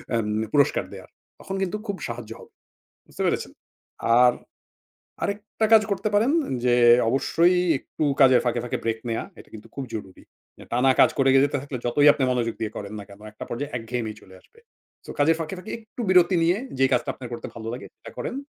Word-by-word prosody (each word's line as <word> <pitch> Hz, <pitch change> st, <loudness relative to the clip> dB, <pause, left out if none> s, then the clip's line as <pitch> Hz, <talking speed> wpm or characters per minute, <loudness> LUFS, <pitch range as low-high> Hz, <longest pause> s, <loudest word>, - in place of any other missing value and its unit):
M 115 Hz, -2 st, 0 dB, 0.3 s
পুরস্কার 140 Hz, -2 st, +3 dB
দেয়ার। -, -, -11 dB, 0.3 s
তখন 195 Hz, -, -6 dB
কিন্তু 190 Hz, +2 st, -1 dB
খুব 200 Hz, -, -3 dB
সাহায্য 115 Hz, -2 st, -7 dB
হবে। -, -, -15 dB, 0.6 s
বুঝতে -, -, -6 dB
পেরেছেন? -, -, -1 dB, 0.7 s
আর 125 Hz, 0 st, +6 dB, 0.9 s
আরেকটা 210 Hz, +2 st, -2 dB
কাজ 220 Hz, -, +8 dB
করতে 200 Hz, +1 st, -1 dB
পারেন 225 Hz, +6 st, +3 dB, 0.3 s
যে 120 Hz, -1 st, +4 dB, 0.3 s
অবশ্যই 165 Hz, +7 st, +2 dB, 0.2 s
একটু -, -, -6 dB, 0.2 s
কাজের 130 Hz, -2 st, +6 dB
ফাঁকে, 120 Hz, 0 st, 0 dB
ফাঁকে 125 Hz, -, -3 dB
ব্রেক 115 Hz, -1 st, -1 dB
নেয়া 115 Hz, -, -2 dB, 0.2 s
এটা -, -, -15 dB
কিন্তু 110 Hz, 0 st, -11 dB
খুব 140 Hz, -, -4 dB
জরুরি। 95 Hz, -4 st, -8 dB, 0.3 s
যে -, -, -12 dB
টানা 125 Hz, +3 st, +3 dB
কাজ -, -, +6 dB
করে 135 Hz, -1 st, +3 dB
যেতে 140 Hz, +1 st, +3 dB
থাকলে 140 Hz, -2 st, -6 dB
যতই 145 Hz, +5 st, +3 dB
আপনি 145 Hz, -3 st, -2 dB
মনোযোগ 120 Hz, -2 st, -1 dB
দিয়ে 110 Hz, -1 st, -4 dB
করেন 100 Hz, 0 st, -7 dB
না -, -, -7 dB
কেন 100 Hz, 0 st, -14 dB
একটা 105 Hz, -, -9 dB
পর্যায়ে 145 Hz, +4 st, -5 dB
একঘেয়েমি 115 Hz, -1 st, -4 dB
চলে 95 Hz, -2 st, -16 dB
আসবে। 460 Hz, -, -24 dB, 0.5 s
সো -, -, -8 dB
কাজের 160 Hz, +3 st, +4 dB
ফাঁকে, 160 Hz, +1 st, -4 dB
ফাঁকে 185 Hz, +4 st, -8 dB
একটু 220 Hz, +2 st, -10 dB
বিরতি 180 Hz, 0 st, +5 dB
নিয়ে 175 Hz, +3 st, +2 dB, 0.2 s
যে 135 Hz, -, +5 dB
কাজটা 135 Hz, -, +1 dB
আপনার 125 Hz, -2 st, -10 dB
করতে 120 Hz, -, -6 dB
ভালো 110 Hz, -1 st, -8 dB
লাগে 125 Hz, -, -8 dB
সেটা -, -, -12 dB
করেন। -, -, -4 dB
135 Hz, 195 wpm, -24 LUFS, 115-175 Hz, 0.9 s, কাজ